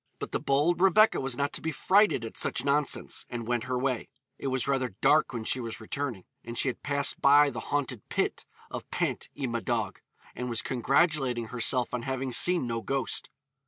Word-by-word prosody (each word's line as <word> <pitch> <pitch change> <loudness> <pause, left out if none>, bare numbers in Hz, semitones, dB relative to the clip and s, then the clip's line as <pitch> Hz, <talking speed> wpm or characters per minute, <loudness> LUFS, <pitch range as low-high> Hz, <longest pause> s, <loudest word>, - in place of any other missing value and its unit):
But - - -6
the - - -1
bold 150 +6 +1
Rebecca 195 +3 +5
was 130 -2 -2
not 140 0 -1
to - - -3
be 160 - -2
frighted 190 - +3
at 115 - -8
such 125 - -1
nonsense, 145 0 0
and 120 -2 -5
went 120 -1 -1
her 130 0 -2
way. 130 -2 -2 0.3
It - - -4
was 130 -1 -1
rather 130 -6 -1
dark 155 0 +4
when 115 -3 -4
she 130 - 0
was 115 -2 -6
returning, 120 -3 -4 0.2
and 115 0 -7
she 135 - +2
had 120 - -6
passed 140 -1 +2
by 145 +1 +6
the - - -5
haunted 135 -6 -2
pit - - -2 0.2
of - - -7
Pant - - -2
y 140 - -2
Madog, 115 -2 -2 0.4
and 125 0 -5
was 115 -2 -1
congratulating 130 -2 +1
herself 125 +1 +2
on 125 - -2
having 130 +1 -3
seen 175 +3 +4
no 115 -1 -3
ghost. 135 0 -2
130 Hz, 195 wpm, -28 LUFS, 120-145 Hz, 0.4 s, by